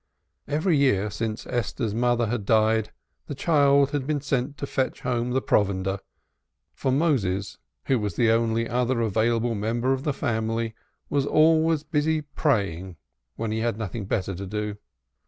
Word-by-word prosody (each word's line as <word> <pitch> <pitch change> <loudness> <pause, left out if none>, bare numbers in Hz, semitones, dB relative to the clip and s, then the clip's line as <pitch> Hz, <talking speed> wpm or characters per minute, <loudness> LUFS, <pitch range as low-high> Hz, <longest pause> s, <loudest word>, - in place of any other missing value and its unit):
Every 155 +4 +1
year 105 -7 +2
since 110 +1 -3
Esther's 120 -2 -2
mother 120 +1 +2
had 110 -1 -2
died, 110 +1 +2 0.4
the 145 - -5
child 140 -2 +3
had 140 -2 -2
been 150 -1 0
sent 140 0 -2
to - - -3
fetch 135 -1 -2
home 120 -1 -1
the 130 +1 0
provender, 95 -1 +1 0.7
for 130 - -1
Moses, 115 - 0 0.3
who 130 -3 +2
was 105 -5 -3
the 115 -2 +3
only 115 0 +1
other 125 +1 0
available 115 +2 +1
member 115 +5 0
of 130 - -2
the 150 - 0
family, 115 -2 -1 0.4
was 140 -1 +1
always 160 0 +4
busy 155 0 0
praying 100 - -1 0.4
when 115 -1 -3
he 110 - -1
had 115 -2 -1
nothing 110 -1 -4
better 95 -1 -1
to 95 +2 -6
do. 105 +1 -3
120 Hz, 155 wpm, -25 LUFS, 110-140 Hz, 0.7 s, always